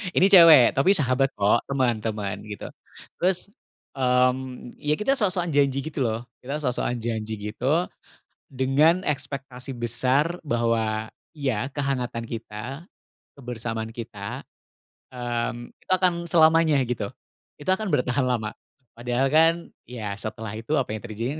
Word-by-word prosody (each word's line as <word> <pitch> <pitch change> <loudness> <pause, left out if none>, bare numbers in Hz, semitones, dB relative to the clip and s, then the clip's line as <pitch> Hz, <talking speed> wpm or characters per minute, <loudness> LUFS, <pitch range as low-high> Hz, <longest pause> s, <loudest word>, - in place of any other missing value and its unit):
Ini 185 - +5
cewek 165 -9 +9
tapi 140 +8 +5
sahabat, 135 -1 +1
kok, 105 +3 +3
teman 130 -5 +1
teman, 105 -2 -3
gitu, 105 -1 -7 0.5
terus, 185 +2 +1 0.5
mmm, 125 -1 0
ya, 150 +1 +1
kita 240 +6 +2
sok-sokan 185 -5 +1
janji, 140 -1 +2
gitu, 155 -2 -5
loh, 110 +1 -1 0.2
kita 140 +4 -4
sok-sokan 125 -2 -1
janji, 110 -1 -3 0.2
gitu, 145 +10 +1 0.6
dengan 145 +7 +3
ekspektasi 135 -3 -4
besar 130 +8 0
bahwa 110 -3 0 0.3
iya, 130 -3 -1
kehangatan 135 -4 -2
kita, 120 - -7 0.5
kebersamaan 115 -3 -4
kita, 115 -1 -6 0.7
mmm, 120 -1 -3
itu - - -11
akan 185 -1 +3
selamanya, 160 -2 +4
gitu, 110 -5 -3 0.5
itu 145 - -5
akan 195 +3 +1
bertahan 125 +2 +1
lama, 115 -4 -1 0.5
padahal, 125 +3 0
kan, 160 +3 +5 0.3
ya, 110 -5 -5
setelah 110 0 -4
itu 120 +7 -4
apa 130 - -2
yang 110 - -7
terjadi, 115 +2 -4
125 Hz, 130 wpm, -25 LUFS, 115-145 Hz, 0.7 s, cewek